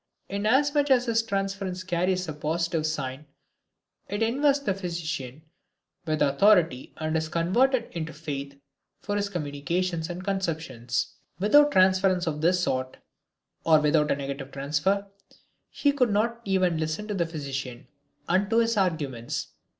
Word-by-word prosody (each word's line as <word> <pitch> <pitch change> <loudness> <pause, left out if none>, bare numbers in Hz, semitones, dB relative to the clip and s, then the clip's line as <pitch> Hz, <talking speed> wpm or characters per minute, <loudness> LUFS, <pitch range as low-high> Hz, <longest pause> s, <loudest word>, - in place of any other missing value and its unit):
Inasmuch 280 +9 +2
as 250 -2 +4
his 230 -1 +2
transference 195 -3 -3
carries 180 0 0
a 155 - -4
positive 160 +1 -1
sign, 140 -1 -4 0.8
it 205 +2 -1
invests 280 +4 +2
the 195 - +2
physician 160 -7 -5 0.6
with 155 -1 +1
authority 160 -2 +3
and 155 0 -2
is 160 0 -1
converted 235 - +2
into 165 -1 -4
faith 140 -3 -6 0.4
for 205 - -3
his 205 0 -1
communications 170 +1 -2
and 175 +1 -5
conceptions. 160 -11 -2 0.2
Without 290 +10 +5
transference 185 -3 +3
of 150 -2 -2
this 180 +2 +3
sort, 130 -3 -2 0.7
or 160 -1 +5
without 150 0 +2
a - - +3
negative 140 0 -5
transfer, 150 +9 0 0.6
he 285 - +1
would 260 -4 +2
not 230 +3 0
even 185 -4 +1
listen 160 +7 -3
to 210 - -2
the 170 -4 0
physician 135 -6 -5 0.4
and 190 +3 +2
to 225 - +2
his 230 -1 +2
arguments. 145 - -1
175 Hz, 140 wpm, -26 LUFS, 150-200 Hz, 0.8 s, Without